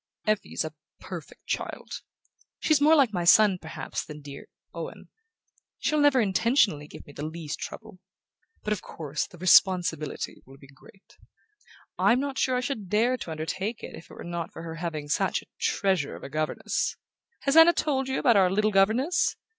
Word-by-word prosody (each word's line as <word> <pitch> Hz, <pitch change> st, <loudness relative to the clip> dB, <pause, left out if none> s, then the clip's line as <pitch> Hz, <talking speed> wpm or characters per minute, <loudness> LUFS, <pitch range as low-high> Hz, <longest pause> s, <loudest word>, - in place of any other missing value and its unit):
"Effie's 215 Hz, -6 st, -1 dB
a 155 Hz, -, -6 dB, 0.3 s
perfect -, -, -9 dB
child. -, -, -4 dB, 0.6 s
She's 310 Hz, -2 st, +2 dB
more 310 Hz, +2 st, +6 dB
like 265 Hz, -8 st, +4 dB
my 175 Hz, -2 st, -1 dB
son, 195 Hz, +1 st, +6 dB
perhaps, 160 Hz, -, -5 dB
than 150 Hz, -1 st, -10 dB
dear 140 Hz, -1 st, -10 dB, 0.3 s
Owen. -, -, -8 dB, 0.7 s
She'll 305 Hz, -, 0 dB
never 290 Hz, -3 st, +5 dB
intentionally 200 Hz, -, +2 dB
give -, -, -12 dB
me 145 Hz, -, -14 dB
the 145 Hz, -, -7 dB
least 155 Hz, -1 st, -5 dB
trouble. 220 Hz, -4 st, -8 dB, 0.6 s
But 210 Hz, -, 0 dB
of 205 Hz, -, -5 dB
course 150 Hz, -2 st, -4 dB
the 175 Hz, -, -15 dB
responsibility 175 Hz, -4 st, +2 dB
will 135 Hz, +1 st, -16 dB
be 140 Hz, -, -16 dB
great...I'm 240 Hz, -, -4 dB
not 275 Hz, 0 st, -3 dB
sure 255 Hz, -, +2 dB
I 250 Hz, -, +1 dB
should 235 Hz, -7 st, -4 dB
dare 230 Hz, +5 st, +2 dB
to 175 Hz, -, -7 dB
undertake 175 Hz, +8 st, -4 dB
it -, -, -7 dB
if -, -, -13 dB
it -, -, -12 dB
were -, -, -9 dB
not 170 Hz, -1 st, -5 dB
for 165 Hz, -, -9 dB
her 165 Hz, -1 st, -6 dB
having 160 Hz, -3 st, -4 dB
such 145 Hz, -, 0 dB
a -, -, -25 dB
treasure 195 Hz, -, 0 dB
of -, -, -12 dB
a -, -, -7 dB
governess. 155 Hz, +1 st, -2 dB, 0.4 s
Has 275 Hz, +1 st, +1 dB
Anna 325 Hz, +1 st, +9 dB
told 275 Hz, -5 st, -1 dB
you 265 Hz, -, -1 dB
about 240 Hz, -6 st, +4 dB
our 185 Hz, -2 st, +5 dB
little 210 Hz, +3 st, +1 dB
governess? 245 Hz, -, +2 dB
195 Hz, 180 wpm, -27 LUFS, 160-255 Hz, 0.7 s, Anna